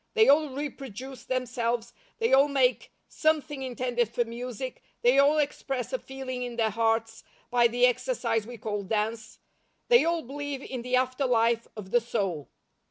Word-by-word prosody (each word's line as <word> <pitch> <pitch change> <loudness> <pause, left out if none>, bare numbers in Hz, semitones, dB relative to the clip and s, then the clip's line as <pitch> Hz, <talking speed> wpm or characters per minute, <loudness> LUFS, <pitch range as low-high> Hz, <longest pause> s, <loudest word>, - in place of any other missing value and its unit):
They 445 -1 +6
all 300 +1 +5
reproduce 265 -2 -7
themselves, 240 -2 -2 0.2
they 455 -7 +1
all 275 +2 +7
make 265 -3 +1 0.2
something 305 -3 0
intended 245 -2 -1
for 235 +1 0
music, 245 +2 -6 0.2
they 250 +3 +5
all 285 +2 +5
express 270 -3 -2
a 260 - 0
feeling 265 -1 -6
in 245 -1 -4
their 225 -2 +1
hearts 225 0 0 0.3
by 240 -1 +5
the 245 +1 +3
exercise 235 - 0
we 245 0 -8
call 210 -1 -3
dance, 220 +2 -2 0.5
they 475 -1 +7
all 335 0 0
believe 280 +1 -5
in 255 -2 -5
the 250 +1 0
after 255 +1 +1
life 230 -1 +2
of 195 -2 -8
the 240 - +4
soul. 195 -10 -2
250 Hz, 165 wpm, -28 LUFS, 230-270 Hz, 0.5 s, all